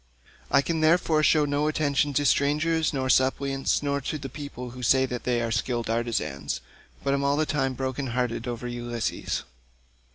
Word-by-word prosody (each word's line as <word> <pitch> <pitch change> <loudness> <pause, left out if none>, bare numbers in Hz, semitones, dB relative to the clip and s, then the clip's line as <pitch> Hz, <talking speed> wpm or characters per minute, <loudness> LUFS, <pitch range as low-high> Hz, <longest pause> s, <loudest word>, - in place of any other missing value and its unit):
I 140 - +4
can 165 0 -1
therefore 160 -1 +3
show 155 -1 +4
no 145 +1 0
attention 145 -1 +1
to 145 - +2
strangers, 155 +3 +2
nor 130 -2 -1
suppliants, 135 +2 +2
nor 140 0 0
to 155 - -3
people 130 -3 -7
who 125 +1 -9
say 130 +2 +4
that 125 -2 -5
they 120 -1 +1
are 115 - -2
skilled 115 +1 -1
artisans, 115 - -2 0.4
but 140 - +1
am 140 0 0
all 140 +1 +2
the 155 - +2
time 135 -4 0
broken 130 +1 -3
hearted 120 -1 -2
about 120 0 -4
Ulysses. 120 -1 -3
135 Hz, 170 wpm, -26 LUFS, 120-145 Hz, 0.4 s, I